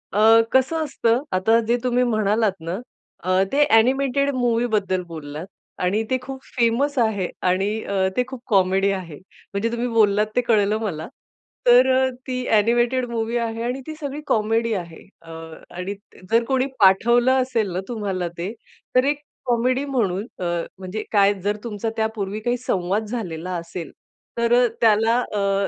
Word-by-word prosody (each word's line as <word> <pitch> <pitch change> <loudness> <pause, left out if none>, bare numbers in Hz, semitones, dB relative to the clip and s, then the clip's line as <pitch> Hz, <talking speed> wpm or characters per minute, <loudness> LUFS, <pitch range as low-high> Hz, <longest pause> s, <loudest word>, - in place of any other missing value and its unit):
अ, 220 +3 +6
कसं 260 +5 +3
असतं, 245 -4 +1
आता 205 +5 +3
जे 240 +1 +3
तुम्ही 250 0 +2
म्हणालात 215 -2 +2
ना, 165 +3 -4 0.5
अ, 185 +1 +2
ते 290 +1 +4
अ‍ॅनिमेटेड 270 +4 +3
मूव्हीबद्दल 230 -6 +1
बोललात 155 -1 -7 0.4
आणि 195 +5 +1
ते 260 - +2
खूप 265 +1 -7 0.2
फेमस 250 +5 +1
आहे 215 -6 +1 0.2
आणि 190 +2 +1
अ, 190 -1 0
ते 250 - +3
खूप 260 -3 -8
कॉमेडी 195 -2 +3
आहे. 180 -6 -5 0.4
म्हणजे 200 +3 0
तुम्ही 235 +1 -2
बोललात 210 -3 +3
ते 245 - +4
कळलं 215 -3 +2
मला. 165 -8 -4 0.6
तर 250 +2 +7
अ, 260 0 +3 0.2
ती 255 -1 -3
अ‍ॅनिमेटेड 240 +4 +2
मूव्ही 230 0 -1
आहे 230 -1 -2
आणि 250 +3 -3
ती 310 - -5
सगळी 285 -1 -5
कॉमेडी 225 +1 +1
आहे. 170 -5 -6
अ, 165 - -13 0.5
आणि 185 +3 -4 0.4
जर 230 +1 +4
कोणी 265 -1 +1
पाठवलं 240 +7 +4
असेल 235 -6 -1
ना 180 - -1
तुम्हाला 200 -6 -3
ते, 180 +5 -4 0.4
तर 255 - +5
एक 290 +1 0 0.2
कॉमेडी 250 +3 +1
म्हणून, 215 -8 -1
अ, - - -4 0.4
म्हणजे 190 +3 -5
काय 200 -1 +4
जर 205 +1 0
तुमचा 225 -1 -3
त्यापूर्वी 215 -2 -2
काही 240 +3 -1
संवाद 200 -3 -1
झालेला 185 -7 -5
असेल, 170 0 -7 0.5
तर 235 0 +2
अ, - - +4
त्याला 225 +1 +4 0.2
अ, 200 -1 +1
225 Hz, 160 wpm, -22 LUFS, 195-245 Hz, 0.6 s, तर